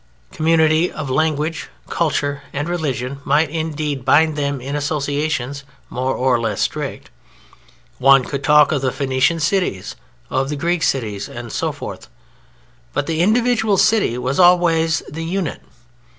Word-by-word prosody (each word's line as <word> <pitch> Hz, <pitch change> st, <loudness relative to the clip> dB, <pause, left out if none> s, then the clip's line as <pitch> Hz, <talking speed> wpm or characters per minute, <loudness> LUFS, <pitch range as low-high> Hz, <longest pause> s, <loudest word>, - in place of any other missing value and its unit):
Community 160 Hz, +1 st, +2 dB
of 145 Hz, -4 st, -5 dB
language, 155 Hz, +2 st, -1 dB, 0.2 s
culture, 145 Hz, -4 st, -1 dB
and 145 Hz, +2 st, -2 dB
religion 140 Hz, -6 st, -3 dB
might, 145 Hz, +2 st, +2 dB
indeed, 150 Hz, -4 st, -3 dB
bind 155 Hz, +4 st, +4 dB
them 140 Hz, -2 st, -2 dB
in 135 Hz, +3 st, -5 dB
associations 145 Hz, -2 st, -2 dB, 0.3 s
more 130 Hz, +1 st, -1 dB
or 125 Hz, -1 st, +2 dB
less 110 Hz, -3 st, -2 dB
strict. -, -, -3 dB, 0.9 s
One 135 Hz, 0 st, +6 dB
could 140 Hz, +2 st, -5 dB
talk 150 Hz, +1 st, +5 dB
of 145 Hz, -4 st, 0 dB
the 130 Hz, -1 st, 0 dB
Phoenician 135 Hz, +5 st, +1 dB
cities, 160 Hz, -, -1 dB, 0.4 s
of 135 Hz, +1 st, 0 dB
the 150 Hz, -, -2 dB
Greek 170 Hz, +4 st, -1 dB
cities, 105 Hz, -9 st, -1 dB
and 120 Hz, -1 st, -8 dB
so -, -, -1 dB
forth. -, -, -8 dB, 0.9 s
But -, -, -1 dB
the 160 Hz, +1 st, -1 dB
individual 225 Hz, 0 st, +2 dB
City 205 Hz, -, +2 dB
was 130 Hz, +4 st, -2 dB
always 170 Hz, -2 st, +4 dB
the 165 Hz, +2 st, -6 dB
unit. 180 Hz, +1 st, -3 dB
150 Hz, 140 wpm, -19 LUFS, 135-165 Hz, 0.9 s, One